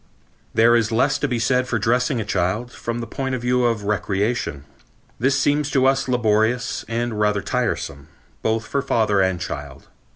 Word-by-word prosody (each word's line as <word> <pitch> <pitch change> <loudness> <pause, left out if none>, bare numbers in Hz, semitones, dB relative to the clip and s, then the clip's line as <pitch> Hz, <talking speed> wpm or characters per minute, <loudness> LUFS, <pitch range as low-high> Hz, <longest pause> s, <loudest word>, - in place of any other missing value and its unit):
There 115 +1 +5
is 115 -1 +1
less 130 +5 +2
to 145 - 0
be 125 -3 -1
said 125 +2 +1
for 120 - 0
dressing 125 +4 +1
a 110 - -3
child, 105 +5 -1
from 120 -1 -4
the - - -4
point 130 +3 -3
of 125 - -5
view 125 0 +2
of 115 -3 0
recreation. 100 - -1 0.6
This 135 +3 +2
seems 145 +1 +1
to 135 -2 +2
us 135 0 +2
laborious 115 -1 +1
and 115 -1 -2
rather 105 -2 +1
tiresome, 70 0 -2 0.3
both 110 0 0
for 140 - -1
father 105 -6 +2
and 95 -2 +1
child. 70 -4 -7
115 Hz, 175 wpm, -22 LUFS, 105-125 Hz, 0.6 s, There